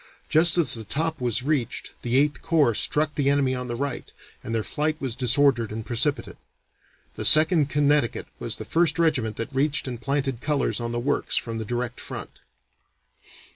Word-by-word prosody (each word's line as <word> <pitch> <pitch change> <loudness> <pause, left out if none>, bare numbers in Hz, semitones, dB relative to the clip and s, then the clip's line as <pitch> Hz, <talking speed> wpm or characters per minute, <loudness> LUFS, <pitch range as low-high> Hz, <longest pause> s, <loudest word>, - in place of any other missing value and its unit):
Just 165 +2 +4
as 170 - +3
the 115 - -3
top 155 +6 -2
was 125 0 +1
reached 140 -4 -2
the 120 +1 0
Eighth 145 -1 +1
Corps 150 -8 +2
struck 150 +7 +1
the 140 -2 0
enemy 140 -2 +2
on 125 -1 -4
the 120 - -4
right, 140 +1 -4 0.3
and - - -8
their 110 - -1
flight 155 +5 -2
was 130 -5 -3
disordered 125 -2 +2
and 110 0 -6
precipitate. 120 -3 -1 0.8
The - - -4
Second 155 -1 +6
Connecticut 145 -4 +1
was - - -4
the - - -7
first 165 -1 +1
regiment 130 -10 0
that 115 +4 -5
reached 140 +2 0
and 120 -2 -6
planted 135 -2 -2
colors 145 -4 0
on 115 0 -3
the 120 - -2
works 140 +4 -1
from 115 -1 -3
the 110 - -4
direct 120 +1 -3
front. - - -7
135 Hz, 180 wpm, -24 LUFS, 120-150 Hz, 0.8 s, Second